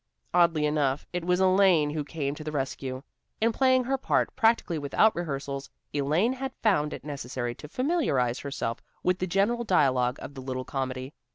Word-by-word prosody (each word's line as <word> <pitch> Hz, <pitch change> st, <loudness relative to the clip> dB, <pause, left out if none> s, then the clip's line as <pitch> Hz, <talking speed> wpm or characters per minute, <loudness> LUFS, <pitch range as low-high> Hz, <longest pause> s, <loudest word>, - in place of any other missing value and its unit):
Oddly 170 Hz, -3 st, +4 dB
enough, 150 Hz, -2 st, 0 dB
it 180 Hz, -1 st, -2 dB
was 180 Hz, +1 st, +2 dB
Elaine 185 Hz, -5 st, +4 dB
who 150 Hz, 0 st, -2 dB
came 140 Hz, -1 st, -3 dB
to 155 Hz, -, -8 dB
the 155 Hz, -, -4 dB
rescue. 135 Hz, -2 st, -3 dB, 0.4 s
In 230 Hz, +1 st, +3 dB
playing 260 Hz, +2 st, +3 dB
her 265 Hz, +2 st, -1 dB
part, -, -, +1 dB
practically 225 Hz, -9 st, +2 dB
without 145 Hz, +10 st, +3 dB
rehearsals, 140 Hz, -4 st, -4 dB, 0.2 s
Elaine 155 Hz, -, +2 dB
had 265 Hz, +1 st, -5 dB
found 150 Hz, -9 st, +3 dB
it -, -, -7 dB
necessary 130 Hz, -4 st, -4 dB
to 150 Hz, -, -11 dB
familiarize 250 Hz, -, +1 dB
herself 135 Hz, -5 st, -4 dB, 0.2 s
with 180 Hz, 0 st, +1 dB
the 185 Hz, -, -1 dB
general 200 Hz, +7 st, +1 dB
dialogue 130 Hz, -, +2 dB
of -, -, -8 dB
the 135 Hz, -, -8 dB
little 130 Hz, -1 st, -4 dB
comedy. 130 Hz, 0 st, -4 dB
150 Hz, 175 wpm, -27 LUFS, 135-195 Hz, 0.4 s, Oddly